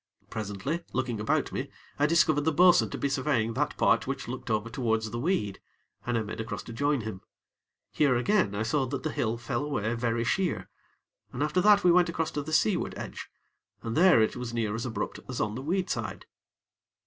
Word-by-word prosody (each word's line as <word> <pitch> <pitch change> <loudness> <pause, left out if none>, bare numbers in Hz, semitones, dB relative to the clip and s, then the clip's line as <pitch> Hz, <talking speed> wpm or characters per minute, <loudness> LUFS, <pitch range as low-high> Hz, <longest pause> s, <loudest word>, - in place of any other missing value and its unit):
Presently, 110 - -3
looking 125 -3 -1
about 105 - 0
me, - - -4 0.3
I 145 - +4
discovered 155 -2 +3
the 160 +2 +1
bo'sun 175 +3 +5
to - - -5
be 140 - 0
surveying 130 -5 0
that - - -1
part - - +3
which - - -4
looked - - -6
over 110 0 0
towards 110 -3 -1
the 120 - -3
weed, 120 - -1 0.5
and 120 -1 +1
I 110 - 0
made 105 +1 -5
across 110 - -5
to 115 - -9
join 145 +2 +1
him. 105 -4 -6 0.7
Here, 140 -4 +3
again, 120 - +2
I 105 - -1
saw 130 +4 0
that 140 +2 -4
the - - -1
hill 115 0 -1
fell 120 +2 -3
away 115 -7 -1
very 115 -1 0
sheer, 180 +6 -1 0.6
and 130 - -2
after 155 +4 +1
that 205 +1 +6
we 180 - +6
went 175 0 +4
across 160 -1 -2
to 145 - -2
the 150 +2 -7
seaward 175 +3 +1
edge, - - -7 0.5
and 115 -1 -3
there 180 -4 +6
it 110 - -1
was 125 -1 -5
near 110 -3 0
as 115 +3 -3
abrupt 115 - -4
as 125 - -4
on 105 0 0
the 125 - -5
weed 180 +6 -1
side. - - -4
125 Hz, 205 wpm, -28 LUFS, 115-155 Hz, 0.7 s, that